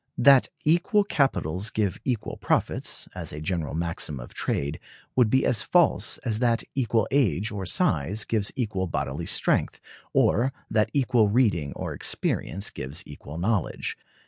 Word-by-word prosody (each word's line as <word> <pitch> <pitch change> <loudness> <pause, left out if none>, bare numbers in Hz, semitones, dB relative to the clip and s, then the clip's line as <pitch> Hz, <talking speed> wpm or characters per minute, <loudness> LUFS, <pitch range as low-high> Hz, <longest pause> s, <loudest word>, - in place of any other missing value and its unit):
That 135 +1 +6 0.2
equal 175 +7 +3
capitals 110 - 0
give 105 -4 -1
equal 120 -5 -2
profits, - - -1
as - - -5
a 75 - -6
general 80 -2 -2
maxim 80 -4 -3
of - - -10
trade, 70 +2 -2 0.4
would 125 -4 +4
be 130 +4 +3
as 115 - +3
false 175 -2 +2
as 110 -3 0
that 120 -2 +2
equal 115 -5 +1
age 110 - +2
or 100 -3 -4
size 90 +9 +1
gives 105 -3 -1
equal 105 -8 -1
bodily - - -3
strength, - - 0 0.3
or 130 +4 +3 0.2
that 105 -1 +2
equal 125 -5 +3
reading 100 - +2
or - - -4
experience 100 +4 -2
gives 70 +5 -5
equal 75 +1 -9
knowledge. 95 +1 -1
105 Hz, 145 wpm, -26 LUFS, 85-125 Hz, 0.4 s, That